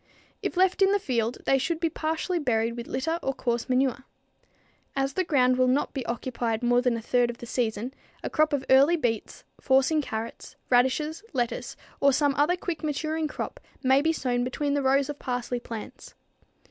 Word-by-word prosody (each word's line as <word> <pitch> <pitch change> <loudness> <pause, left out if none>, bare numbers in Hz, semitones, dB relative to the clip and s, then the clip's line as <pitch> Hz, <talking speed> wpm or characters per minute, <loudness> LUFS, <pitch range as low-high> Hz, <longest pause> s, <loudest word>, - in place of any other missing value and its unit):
If - - -3
left 375 +1 +3
in 390 0 +6
the 405 - +4
field, 245 - -1
they 270 - +3
should 330 +4 -1
be 330 - +1
partially 320 +3 -2
buried 230 -5 0
with 235 -1 -6
litter 320 +6 -1
or 270 - -2
coarse 240 0 -2
manure. 255 0 +1 0.9
As 270 0 0
the 370 - +1
ground 255 -6 +3
will 255 - +4
not 265 +3 +1
be 270 - -3
occupied 235 -1 -2
more 245 0 +4
than 250 -2 +1
a - - -5
third 245 +1 +2
of 235 - -5
the 240 - -9
second - - -9
season, 220 +4 -5 0.3
a - - -2
crop 310 -1 +3
of 280 -2 -1
early 275 +6 +6
beets, 225 -7 -2 0.2
forcing 270 +3 +3
carrots, 225 -4 -6 0.2
radishes, 265 +7 +2
lettuce 245 -3 -2 0.2
or 280 - +5
some 285 +1 +2
other 295 +5 +2
quick 350 -3 -5
maturing 310 +1 -1
crop - - -6 0.2
may 265 +1 +5
be 320 +2 +2
sown 245 -6 -1
between 280 +3 -1
the 285 - +1
rows 270 +1 +3
of 295 -1 -6
parsley 245 -1 -2
plants. 230 -2 -9
265 Hz, 195 wpm, -27 LUFS, 245-305 Hz, 0.9 s, in